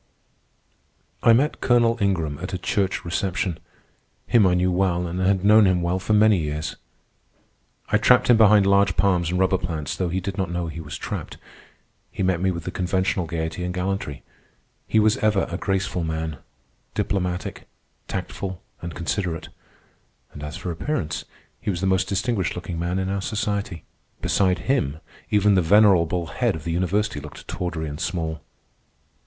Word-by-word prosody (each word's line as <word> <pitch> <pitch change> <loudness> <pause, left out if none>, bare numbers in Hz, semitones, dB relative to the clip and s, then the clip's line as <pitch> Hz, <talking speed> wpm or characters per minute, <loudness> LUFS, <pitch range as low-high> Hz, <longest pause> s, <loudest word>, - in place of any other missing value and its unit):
I 115 - +6
met 140 +6 +1
Colonel 120 -1 +3
Ingram 80 -8 0
at 90 +2 -4
a - - -1
church 95 +1 -1
reception. 90 -1 -1 0.7
Him 110 -5 +4
I 90 - +3
knew 90 +1 +2
well 90 -1 +1
and 85 +2 -4
had 95 +1 +2
known 100 -4 +5
well 90 +2 0
for 95 +3 -1
many 105 -2 +5
years. 75 0 -3 1.1
I 110 - +3
trapped 125 +3 +5
him 120 - +7
behind 105 -2 +6
large 100 -2 +3
palms 90 -2 +2
and 90 - -1
rubber 95 0 +2
plants, 80 -5 -3
though 90 -2 -1
he 90 +2 -1
did 100 +2 -5
not 95 -3 -1
know 85 0 -2
he 80 +1 -7
was 75 -2 -7
trapped. - - -5 0.7
He - - -4
met 90 -2 +1
me 95 - +2
with 85 -2 -3
the - - -4
conventional 95 -1 0
gayety 80 +1 -3
and 90 +1 -3
gallantry. 90 -6 -3 0.6
He - - +1
was 110 0 +3
ever 105 -2 +2
a 85 - -2
graceful 95 -2 -1
man, 80 -1 -3 0.6
diplomatic, 90 -2 -2 0.4
tactful, 95 -2 -5 0.2
and 85 -2 -6
considerate. 85 -1 -3 0.8
And 75 - -9
as 75 0 -6
for 90 - -4
appearance, 85 - -3 0.3
he - - -4
was 90 -4 -1
the 95 - -1
most 95 0 +2
distinguished 100 0 0
looking 90 -1 -5
man 85 +2 -1
in 95 0 -1
our 100 0 -1
society. 100 -5 -2 0.4
Beside 95 -2 +1
him 80 - +1 0.3
even 105 0 +4
the 95 - +4
venerable 90 -2 +4
head - - 0
of 80 - -8
the 85 - -3
university 90 0 0
looked 75 +1 -11
tawdry 85 -3 -3
and 75 0 -6
small. 80 -4 -3
90 Hz, 170 wpm, -23 LUFS, 85-100 Hz, 1.1 s, him